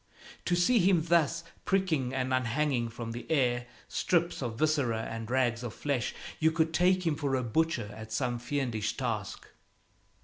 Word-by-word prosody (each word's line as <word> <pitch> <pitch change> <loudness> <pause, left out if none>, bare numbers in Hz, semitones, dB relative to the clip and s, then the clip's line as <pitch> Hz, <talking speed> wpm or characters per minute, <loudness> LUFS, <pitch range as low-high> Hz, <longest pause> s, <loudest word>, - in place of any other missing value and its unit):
To 175 - +2
see 175 +8 +4
him 180 -3 +4
thus 170 -2 +2 0.2
pricking 165 -10 +1
and 130 0 -1
unhanging 130 0 +1
from 115 0 -6
the 120 +1 -7
air 125 -5 +2 0.2
strips 170 -3 0
of 115 -3 -3
viscera 135 -7 +1
and 115 0 -5
rags 120 -2 +1
of 120 -2 -6
flesh, 140 -4 -1 0.2
you 160 - +4
could 160 0 +1
take 180 +2 +3
him 160 -3 +2
for 140 -2 -1
a 130 - 0
butcher 120 -3 0
at 110 0 -9
some 120 +1 -1
fiendish 120 -5 -2
task. 115 -6 -3
130 Hz, 165 wpm, -30 LUFS, 120-160 Hz, 0.2 s, see